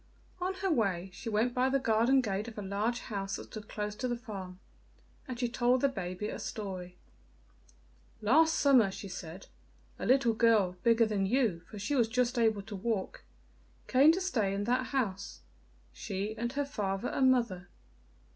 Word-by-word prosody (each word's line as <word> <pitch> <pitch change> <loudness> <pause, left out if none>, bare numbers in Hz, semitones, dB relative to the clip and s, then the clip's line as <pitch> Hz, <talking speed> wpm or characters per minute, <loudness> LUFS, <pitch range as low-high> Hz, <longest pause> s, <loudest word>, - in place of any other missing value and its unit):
On 375 +1 -1
her 385 -1 -1
way 195 - 0
she 230 - -6
went 225 +3 +1
by 255 +1 +2
the 275 - +2
garden 245 +1 +3
gate 210 -2 -2
of 225 - -9
a 210 - -4
large 210 +5 -1
house 195 -2 -4
that - - -6
stood 210 -2 -10
close 210 -1 -3
to 255 - -2
the 240 -1 -2
farm, 195 -6 -8 0.7
and 250 -2 -6
she 245 - +1
told 245 +1 +2
the 280 - +4
baby 185 -3 -4
a - - -5
story: 185 -4 -6 1.2
"Last 310 +10 +4
summer," 260 -8 +5
she 195 +1 -7
said, 180 0 -8 0.5
"a - - -3
little 255 -2 +4
girl, 220 -5 +3
bigger 230 0 +4
than 205 -3 0
you, 230 -7 +1
for 215 - -9
she 205 +8 -2
was 240 -5 +3
just 250 +1 0
able 220 -3 +2
to 205 +1 -8
walk, 200 0 -3 0.6
came 275 +4 +6
to 370 - -2
stay 220 - 0
in 200 - -2
that 250 +3 0
house 200 -8 -3 0.5
she 195 - -4
and 235 +3 -3
her 285 +1 -1
father 205 -5 -2
and 260 -1 +3
mother. 190 -9 -1
225 Hz, 180 wpm, -31 LUFS, 195-255 Hz, 1.2 s, came